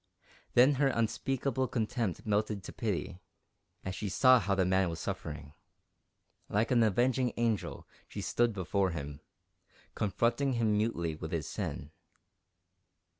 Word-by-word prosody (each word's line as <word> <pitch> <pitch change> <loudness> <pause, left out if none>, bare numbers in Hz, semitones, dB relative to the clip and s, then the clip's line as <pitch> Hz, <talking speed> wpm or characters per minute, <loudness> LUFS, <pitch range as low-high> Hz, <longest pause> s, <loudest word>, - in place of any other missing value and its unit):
Then 130 +4 +7
her 140 - +5
unspeakable 130 +2 0
contempt 115 -5 -2
melted 105 -1 0
to - - -8
pity, 95 -4 -3 0.7
as 95 - -3
she 105 +1 -4
saw 130 +5 +6
how 100 -2 0
the 95 -1 +2
man 95 0 +2
was 85 - -5
suffering. 75 -1 -5 1.0
Like 110 +4 +1
an 120 -2 +4
avenging 120 +4 +2
angel 115 -3 -1 0.2
she - - -7
stood 120 0 +1
before 95 -1 0
him, 75 -3 -6 0.7
confronting 120 +6 +1
him 115 -3 +2
mutely 105 -7 0
with 80 +1 -7
his 80 -2 -2
sin. 75 - -5
105 Hz, 130 wpm, -31 LUFS, 90-120 Hz, 1.0 s, Then